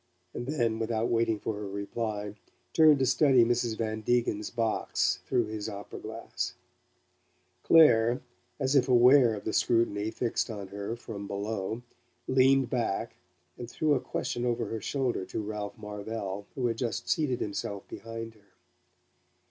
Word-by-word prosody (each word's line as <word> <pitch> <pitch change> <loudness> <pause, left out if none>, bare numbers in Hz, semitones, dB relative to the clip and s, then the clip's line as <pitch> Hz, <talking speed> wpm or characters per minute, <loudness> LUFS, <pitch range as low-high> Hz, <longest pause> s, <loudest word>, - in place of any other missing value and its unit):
and 120 - -5
then, 120 -7 0
without 115 0 0
waiting 115 -1 +2
for 110 - -3
her 105 0 -5
reply, 105 +1 -4 0.4
turned 155 -2 +7
to 135 - +2
study 130 -1 +5
Mrs. 120 -1 0
Van 110 -1 -2
Degen's 110 -2 0
box 110 -5 0
through 125 -3 +2
his 105 -1 -5
opera 100 0 -8
glass. 110 +1 -5 1.1
Clare, 120 -7 +6 0.4
as 135 0 +1
if 130 -1 +4
aware 125 -1 +6
of 105 - -8
the 110 - -3
scrutiny 110 -3 +2
fixed 115 +1 -1
on 100 -4 -6
her 100 +3 -4
from 105 -4 -7
below 105 +3 -3 0.4
leaned 135 0 +4
back 115 -6 -1 0.5
and 120 -1 -6
threw 155 +3 +1
a 135 - +2
question 120 - -3
over 120 -1 0
her 115 -1 -4
shoulder 130 -4 -1
to - - -5
Ralph 105 0 -5
Marvell, 105 -1 -5
who 130 - -1
had 115 -2 -1
just 120 -3 -2
seated 140 -6 +1
himself 100 -1 -4
behind 115 0 -7
her. 105 -2 -27
115 Hz, 150 wpm, -29 LUFS, 105-125 Hz, 1.1 s, turned